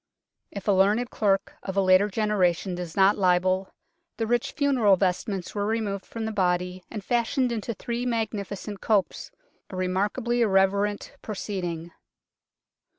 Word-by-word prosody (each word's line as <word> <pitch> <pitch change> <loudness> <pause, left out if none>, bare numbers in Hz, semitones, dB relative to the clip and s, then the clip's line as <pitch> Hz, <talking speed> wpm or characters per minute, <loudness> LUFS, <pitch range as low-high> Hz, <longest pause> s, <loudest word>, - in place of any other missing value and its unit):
If 200 0 -8
a - - +5
learned 205 +5 +3
clerk 195 -2 0
of 190 0 -5
a - - +5
later 185 +2 +5
generation 195 -4 +1
does 175 -2 -6
not 195 +1 +4
libel, 185 +1 +2 0.5
the 225 - -1
rich 240 +1 0
funeral 260 -9 +3
vestments 190 0 -1
were 205 -1 -1
removed 215 -3 -2
from 225 -1 -5
the 220 - -2
body 180 -2 0
and 215 -3 -6
fashioned 240 +2 +1
into 230 0 -3
three 235 +4 -3
magnificent 210 -3 -3
copes 205 -4 0 0.4
a 190 - -8
remark 185 +3 0
ably 240 -1 0
irreverent 200 0 +1
proceeding. 175 -5 -4
200 Hz, 145 wpm, -26 LUFS, 185-220 Hz, 0.5 s, a